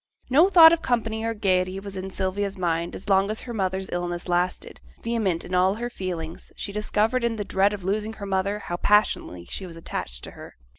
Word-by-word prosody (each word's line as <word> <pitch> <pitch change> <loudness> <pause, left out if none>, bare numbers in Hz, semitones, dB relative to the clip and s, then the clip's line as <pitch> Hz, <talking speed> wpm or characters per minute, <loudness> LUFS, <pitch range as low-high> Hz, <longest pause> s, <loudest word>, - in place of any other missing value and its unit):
No 320 +8 +6
thought 330 -4 +9
of 335 - 0
company 225 -4 -1
or 230 0 -1
gaiety 185 -2 +1
was 195 0 -8
in 190 0 -5
Sylvia's 195 +1 -2
mind 170 -1 -1
as 190 - -9
long 195 0 +3
as 215 - -2
her 240 - -7
mother's 190 -2 -1
illness 175 0 -3
lasted; 180 +1 -1 0.2
vehement 215 -8 -1
in 180 - -8
all 185 +2 +3
her 240 +2 -4
feelings, 170 -6 -6
she 200 - -5
discovered 215 +4 0
in 235 -1 +1
the 205 -2 -4
dread 195 +1 +2
of 205 -3 -6
losing 210 +3 -1
her 205 - -7
mother 195 +1 0
how 175 -4 -5
passionately 190 - +2
she 190 - -5
was 170 - -10
attached 60 - -6
to - - -8
her. - - -12
195 Hz, 210 wpm, -25 LUFS, 180-215 Hz, 0.2 s, thought